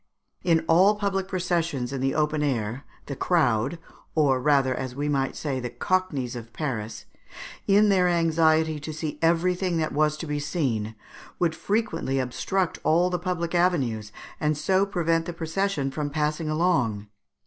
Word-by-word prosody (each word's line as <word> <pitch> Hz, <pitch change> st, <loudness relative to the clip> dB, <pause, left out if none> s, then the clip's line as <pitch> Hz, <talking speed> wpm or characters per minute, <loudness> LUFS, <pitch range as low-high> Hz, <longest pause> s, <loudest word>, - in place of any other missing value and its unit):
In 165 Hz, -3 st, +2 dB
all 190 Hz, +6 st, +5 dB
public 195 Hz, -2 st, -1 dB
processions 170 Hz, -8 st, -1 dB
in 135 Hz, -, -3 dB
the 135 Hz, 0 st, 0 dB
open 150 Hz, 0 st, +1 dB
air 125 Hz, -3 st, -2 dB, 0.2 s
the 140 Hz, -, -5 dB
crowd 135 Hz, -3 st, +1 dB, 0.4 s
(or 135 Hz, -5 st, +3 dB
rather, 135 Hz, -2 st, +3 dB
as 130 Hz, 0 st, -5 dB
we 145 Hz, +2 st, -2 dB
might 135 Hz, -2 st, 0 dB
say, 140 Hz, -4 st, -2 dB
the 125 Hz, -1 st, -4 dB
Cockneys 140 Hz, -5 st, -1 dB
of 115 Hz, -1 st, -8 dB
Paris), 115 Hz, -8 st, -4 dB, 0.6 s
in 205 Hz, +1 st, +5 dB
their 185 Hz, -2 st, +4 dB
anxiety 160 Hz, -2 st, +2 dB
to 155 Hz, +2 st, -6 dB
see 155 Hz, 0 st, -5 dB
everything 175 Hz, +2 st, +2 dB
that 155 Hz, -1 st, -1 dB
was 155 Hz, +1 st, +2 dB
to 160 Hz, -, -5 dB
be 150 Hz, -1 st, -2 dB
seen, 120 Hz, -, -2 dB, 0.4 s
would 170 Hz, -2 st, +1 dB
frequently 165 Hz, -, -1 dB
obstruct 165 Hz, +8 st, -1 dB
all 175 Hz, +3 st, +3 dB
the 180 Hz, -, -1 dB
public 175 Hz, -1 st, -2 dB
avenues, 135 Hz, -, +1 dB, 0.3 s
and 150 Hz, -1 st, 0 dB
so 190 Hz, +6 st, +2 dB
prevent 165 Hz, -3 st, 0 dB
the 175 Hz, -, -4 dB
procession 165 Hz, -3 st, -1 dB
from 145 Hz, +1 st, -3 dB
passing 150 Hz, +1 st, -1 dB
along. 155 Hz, -, +1 dB
155 Hz, 160 wpm, -25 LUFS, 135-175 Hz, 0.6 s, all